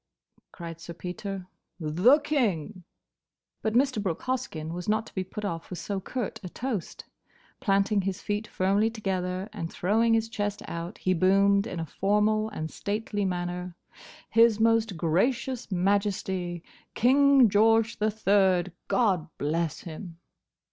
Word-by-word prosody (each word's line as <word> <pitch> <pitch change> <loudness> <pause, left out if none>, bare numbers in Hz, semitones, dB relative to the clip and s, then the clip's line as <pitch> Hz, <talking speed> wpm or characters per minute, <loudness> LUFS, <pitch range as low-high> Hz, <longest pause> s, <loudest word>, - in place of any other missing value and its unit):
cried 165 -2 -8
Sir 170 0 -8
Peter, 185 +2 -5 0.3
"The 180 - +4
King!" 200 - -1 0.8
But 220 0 -1
Mr. 255 -3 +2
Brooke 180 -5 -3
Hoskyn 170 -12 -3
was 180 +3 -5
not 215 +1 +1
to - - -14
be 190 - -2
put 210 +3 -6
off 165 -4 -4
with 180 - -6
so 200 +2 -3
curt 240 +3 -4
a 180 - -6
toast. 230 -3 -4 0.5
Planting 200 0 +2
his 190 0 -3
feet 210 +1 -3
firmly 200 +4 +1
together, 190 -4 -3
and 170 -5 -5
throwing 225 +5 +2
his 225 0 +1
chest 205 -2 -3
out, 170 +4 -5
he 185 - +1
boomed 200 +3 +3
in 175 - -5
a 165 - -2
formal 210 +6 +1
and 160 -7 -5
stately 205 0 -2
manner, 180 -1 -3 0.6
"His 230 -1 +5
Most 225 -4 +2
Gracious 235 +9 0
Majesty, 190 -2 0 0.3
King 275 +1 +5
George 225 +2 +3
the 215 +1 +2
Third, 195 -4 +2 0.2
God 190 -9 +2
bless 160 +2 -1
him!" 165 +1 -8
200 Hz, 140 wpm, -27 LUFS, 180-220 Hz, 0.8 s, His